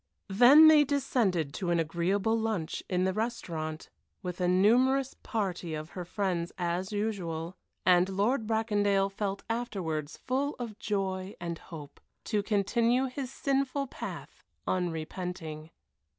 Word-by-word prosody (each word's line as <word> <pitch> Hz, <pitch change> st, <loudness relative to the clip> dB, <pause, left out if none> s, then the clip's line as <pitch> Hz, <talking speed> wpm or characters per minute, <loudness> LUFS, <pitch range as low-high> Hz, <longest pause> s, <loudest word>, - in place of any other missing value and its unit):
Then 255 Hz, +10 st, +8 dB
they 310 Hz, -1 st, +8 dB
descended 235 Hz, -, 0 dB
to 185 Hz, -4 st, -3 dB
an 170 Hz, -1 st, +2 dB
agreeable 180 Hz, +7 st, +1 dB
lunch 220 Hz, -8 st, -2 dB
in 180 Hz, -1 st, +1 dB
the 190 Hz, 0 st, +1 dB
restaurant, 170 Hz, -8 st, -3 dB, 0.4 s
with 180 Hz, 0 st, -5 dB
a 180 Hz, -, +2 dB
numerous 250 Hz, +9 st, +3 dB
party 185 Hz, -7 st, -3 dB
of 155 Hz, +1 st, -7 dB
her 180 Hz, -2 st, -6 dB
friends 180 Hz, -2 st, -2 dB
as 180 Hz, +2 st, -2 dB
usual, 185 Hz, -5 st, -3 dB, 0.3 s
and 180 Hz, 0 st, +5 dB
Lord 215 Hz, +5 st, 0 dB
Bracondale 205 Hz, -3 st, +1 dB
felt 195 Hz, 0 st, -3 dB
afterwards 175 Hz, -10 st, -3 dB
full 275 Hz, +3 st, -1 dB
of 235 Hz, -4 st, -6 dB
joy 190 Hz, -1 st, -2 dB
and 170 Hz, -1 st, -4 dB
hope, 150 Hz, -4 st, -11 dB, 0.2 s
to 210 Hz, -, 0 dB
continue 230 Hz, +5 st, +2 dB
his 260 Hz, 0 st, -5 dB
sinful 275 Hz, 0 st, 0 dB
path 260 Hz, -, -8 dB, 0.2 s
unrepenting. 165 Hz, -2 st, -3 dB
195 Hz, 130 wpm, -30 LUFS, 175-230 Hz, 0.4 s, Then